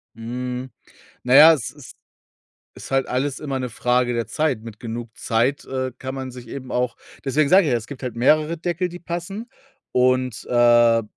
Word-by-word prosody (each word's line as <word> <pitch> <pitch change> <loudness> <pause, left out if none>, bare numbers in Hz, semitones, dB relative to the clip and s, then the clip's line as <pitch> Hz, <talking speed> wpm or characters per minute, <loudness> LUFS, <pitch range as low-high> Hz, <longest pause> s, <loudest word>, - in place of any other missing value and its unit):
Mhm. 125 +3 -5 0.5
Na 125 +1 +2
ja, 155 +4 +10
es 140 -8 -2
ist 145 -3 -14 0.8
ist - - -10
halt 135 0 +1
alles 135 +2 -1
immer 140 -3 -3
'ne 125 -1 -3
Frage 125 +1 +1
der 115 -1 -1
Zeit. 150 -8 -1
Mit 115 -2 -10
genug 115 0 -6
Zeit, 120 +5 0
äh, 130 -1 -3
kann 130 0 -5
man 130 -1 -5
sich 125 -1 -11
eben 130 -2 -8
auch 125 -1 -1 0.3
deswegen 145 +2 +2
sage 185 -2 +6
ich - - +1
ja, 120 - +3
es 115 - -7
gibt 140 +1 -10
halt 125 -4 -5
mehrere 155 +7 +2
Deckel, 175 +2 -2
die 175 - -8
passen. 175 +6 -5 0.4
Und, 130 -1 +1
äh 120 -1 +5
130 Hz, 190 wpm, -22 LUFS, 120-145 Hz, 0.8 s, ja